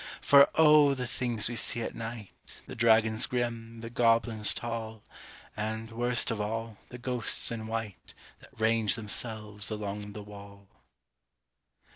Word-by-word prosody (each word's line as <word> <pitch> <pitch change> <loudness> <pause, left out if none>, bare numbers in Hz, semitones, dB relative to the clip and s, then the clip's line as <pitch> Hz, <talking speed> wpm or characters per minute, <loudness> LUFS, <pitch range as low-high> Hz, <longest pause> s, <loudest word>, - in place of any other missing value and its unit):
For 140 -2 +6
O! 150 -3 +6
the 125 -1 -4
things 120 -3 -3
we 120 - -4
see 115 0 -1
at - - -5
night 115 -2 -9
The - - -9
dragons 110 -1 +3
grim, 115 -2 -4
the 115 0 -8
goblins 115 -2 +3
tall, 110 -2 -5 0.5
And, 110 +1 -4
worst 120 +1 +2
of 110 -2 -2
all, 115 0 -4
the 125 - -9
ghosts 125 -2 0
in 110 -1 -5
white 110 -3 -6 0.2
That - - -19
range 110 -1 +1
themselves 105 -1 -3
along 105 -1 -5
the 105 - -8
wall! 100 -1 -13
115 Hz, 140 wpm, -29 LUFS, 105-120 Hz, 0.5 s, For